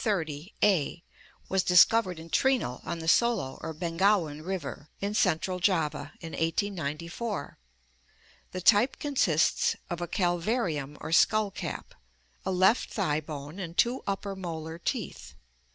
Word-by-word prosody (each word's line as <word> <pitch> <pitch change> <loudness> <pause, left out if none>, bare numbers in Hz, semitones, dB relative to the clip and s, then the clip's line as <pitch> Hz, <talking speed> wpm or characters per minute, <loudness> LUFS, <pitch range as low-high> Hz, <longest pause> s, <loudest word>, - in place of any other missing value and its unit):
XXX, 165 -5 -2
A), 175 -4 +2 0.4
was 190 0 +2
discovered 185 +1 +5
in 165 +1 -11
Trinil, 255 - +1
on 170 - -4
the 165 0 -7
Solo 200 - +2
•or 160 - -4
Bengawan 170 -2 +1
River 165 -5 -5
in 200 +1 -2
central 180 -2 +1
Java, 165 -6 0
in 165 -2 -7
1894. 170 - -3 0.9
The 185 - -5
type 215 +7 +4
consists 220 - +2 0.2
of 175 0 -3
a 175 - -2
calvarium 175 - -1
or 155 - -6
skull 210 +5 +4
cap, - - -6 0.5
a - - -2
left 190 +6 +3
thigh 155 -7 0
bone, 150 +3 -8
and 170 -2 -6
two 245 +2 +2
upper 195 0 -2
molar 165 -3 -6
teeth. - - -4
175 Hz, 135 wpm, -28 LUFS, 160-200 Hz, 0.9 s, discovered